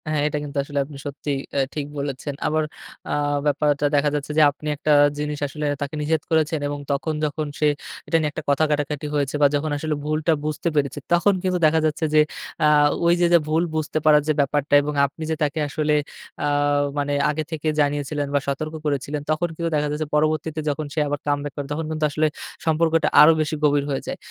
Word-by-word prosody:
হ্যাঁ, 155 -1 0
এটা 150 - -2
কিন্তু 145 0 -6
আসলে 145 0 -3
আপনি 145 0 -11
সত্যি 145 +1 -4 0.2
অ্যা 140 - +2
ঠিক 150 -2 -2
বলেছেন। 140 0 -4
আবার 155 +1 +1 0.4
অ্যা - - -1 0.3
ব্যাপারটা 145 0 +1
দেখা 145 +1 +3
যাচ্ছে 145 0 -3
যে - - +6
আপনি 150 +2 -10
একটা 150 +1 -1 0.3
জিনিস 150 0 -3
আসলে 150 +2 -5 0.2
তাকে 145 +2 -3
নিষেধ 155 +1 0
করেছেন 160 -1 +2
এবং 145 0 -4
তখন 140 +3 -1
যখন 150 +1 -2
সে 150 - +3 0.4
এটা 165 - +3
নিয়ে 155 -1 0
একটা 155 - -6
কথা 140 +2 +3
কাটাকাটি 150 0 -1
হয়েছে 145 -1 0
বা 145 - +7
যখন 150 +1 -1
আসলে 155 +1 -2
ভুলটা 155 +2 +1
বুঝতে 155 +2 -2
পেরেছে, 140 -1 0
তখন 175 +4 +4
কিন্তু 185 -1 +1
দেখা 160 +1 +4
যাচ্ছে 155 +1 0
যে 155 - +7 0.4
অ্যা 150 - +5 0.4
ওইযে 175 +1 +4
যে 170 - +8
ভুল 160 +2 +2
বুঝতে 155 0 -2
পারার 150 -1 +6
যে 155 - +3
ব্যাপারটা 145 +1 0
এবং 150 +1 -3
আপনি 155 +3 -7
যে - - +1
তাকে 150 +1 -1
আসলে 150 0 0 0.4
অ্যা 145 - 0 0.5
মানে 145 0 0 0.2
আগে 155 +1 -1
থেকে 160 -1 -3
জানিয়েছিলেন 145 0 -1
বা 140 - +3
সতর্ক 155 +3 -3
করেছিলেন 145 0 -2
তখন 155 +3 +1
কিন্তু 170 +1 -2
দেখা 150 0 +1
যাচ্ছে 150 +1 -2
পরবর্তীতে 155 +1 0
যখন 150 +1 -2
সে - - -1
আবার 145 0 -2
কামবাক 145 0 -1
করে 145 -2 -5
তখন 155 +2 -2
কিন্তু 155 -1 0
আসলে 155 +2 +2 0.4
সম্পর্কটা 160 0 +2
আরো 150 +2 +9
বেশি 155 0 -1
গভীর 145 -1 +3
হয়ে 135 - -1
যায়। - - -4
150 Hz, 205 wpm, -23 LUFS, 145-155 Hz, 0.5 s, আরো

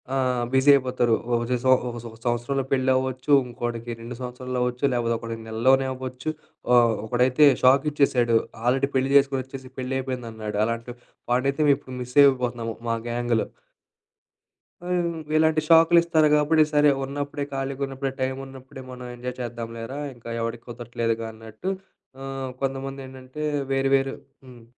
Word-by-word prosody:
ఆహ్, 125 -2 +1
బిజీ 130 +2 +4
అయిపోతారు. 125 -3 +1 0.3
ఒచే 125 +1 0
సొ - - +4
ఒక 125 - -4 0.3
ఒక 115 - -15
సంవత్సరంలో 120 +3 -1
పెళ్లవ్వచ్చు, 130 +1 0 0.2
ఇంకోడికి 120 -1 -5
2 120 +1 -7
సంవత్సరాల్లో 125 0 -4
అవ్వచ్చు. 125 +2 -3
లేకపోతే 115 -1 0
ఒకడికి 115 -1 -6
నెలల్లోనే 130 +4 +3
అవ్వచ్చు. 130 +3 -5 0.4
ఆహ్, 120 -2 +5
ఒకడైతే 125 +5 +4 0.2
షాకిచ్చేసాడు 130 -3 +4 0.3
ఆల్రెడీ 135 +3 +2
పెళ్లి 135 +1 +1
జేసుకొనొచ్చేసి, 135 -1 -1
పెళ్లి 130 +1 -3
అయిపోయిందన్నాడు. 115 -5 -4
అలాంటి 115 +1 -4 0.4
వాడినైతే 135 +4 +1
మేము 140 - +6
ఇప్పుడు 130 -2 -10
మిస్ 125 0 -8
అయిపోతున్నాము 120 -4 +1
మా 115 - +2
గ్యాంగ్‌లో. 120 -1 0 1.4
ఆహ్, - - -1
హ్మ్. 170 -1 -3 0.2
ఇలాంటి 160 0 +3
షాకులిస్తారు 165 -1 +5
కాబట్టి, 155 +1 +4
సరే 150 0 +5
ఉన్నప్పుడే 145 +1 -4
ఖాళీగా 135 0 -3
ఉన్నప్పుడే 135 0 -4
టైమున్నప్పుడే 130 +1 -5
మనం 125 0 -8
ఎంజాయ్ 125 +1 -6
చేద్దాంలేరా 115 +2 -6 0.2
ఇంకా 120 -1 -12
ఎవడికి 115 0 -4
కుదరట్లేదుగా 115 -1 -3
అన్నట్టు. 110 - -6 0.5
ఆహ్, 135 -1 -5
కొంతమందేంటంటే 135 +1 -5 0.3
వేరు 135 0 +1
వేరు 135 0 -1 0.3
హ్మ్. 125 -3 -14
130 Hz, 135 wpm, -24 LUFS, 120-135 Hz, 1.4 s, మేము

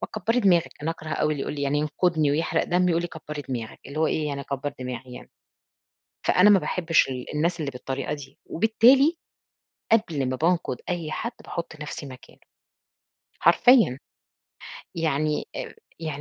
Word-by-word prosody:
فكبّري 225 +4 0
دماغك، 180 -6 +3
أنا 160 - 0
أكره 160 -1 -7
أوي 155 -1 +1
اللي 145 - -5
يقول - - -4
لي 145 - -4
يعني 140 +1 +1
ينقدني 155 0 +1
ويحرق 160 +3 +1
دمي، 180 +1 +2
ويقول 170 -1 +2
لي 175 - -3
كبّري 150 -2 -7
دماغك، 115 -4 -5
اللي 140 +3 -7
هو 160 - +3
إيه 155 -1 0
يعني 140 -1 -3
أكبّر 140 +1 -4
دماغي 125 0 -6
يعني، - - -11 1.0
فأنا 185 +3 +6
ما 200 -2 +7
باحبش 170 -4 +2
ال 125 -1 -5
الناس 170 +3 0
اللي 145 -3 -2
بالطريقة 135 +3 -4
دي، 140 -2 -9
وبالتالي 250 - +4 0.8
قبل 160 - +2
ما 130 - -1
بانقد 165 -4 0
أي 170 -3 -2
حد 235 +8 -3
باحط 165 -2 -6
نفسي 150 -1 -6
مكانُه، 130 -1 -13 1.0
حرفيًا، 235 - +5 1.0
يعني 155 -2 0 0.5
يعني 155 -3 -4
155 Hz, 160 wpm, -25 LUFS, 140-175 Hz, 1.0 s, ما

